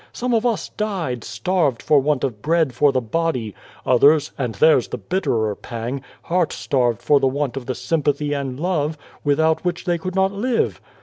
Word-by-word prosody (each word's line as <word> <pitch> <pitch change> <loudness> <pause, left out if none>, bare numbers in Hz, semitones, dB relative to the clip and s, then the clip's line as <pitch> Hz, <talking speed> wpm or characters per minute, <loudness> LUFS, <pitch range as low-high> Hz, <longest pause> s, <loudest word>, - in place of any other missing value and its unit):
Some 250 0 -2
of 230 +1 +2
us 230 -3 -2
died, 180 - -3
starved 170 -10 -1
for 150 - +4
want 145 0 0
of 115 -6 -2
bread 160 -2 +1
for 140 +4 +3
the 130 - 0
body; 125 -4 -2 0.3
others 145 +4 +4
and 125 -5 -3
theirs 155 -6 +4
the - - -5
bitterer 110 - -1
pang 120 +5 -5 0.2
heart 175 -2 +1
starved 120 -4 0
for 145 +3 +4
the 135 - +2
want 140 0 -1
of 135 -3 -6
the 130 - -2
sympathy 145 +2 0
and 135 -2 -3
love, 160 -3 -1 0.3
without 160 +2 +2
which 175 -1 -2
they 175 -1 0
could 185 +2 -5
not 190 0 +2
live. 230 +4 -1
145 Hz, 185 wpm, -21 LUFS, 125-170 Hz, 0.3 s, for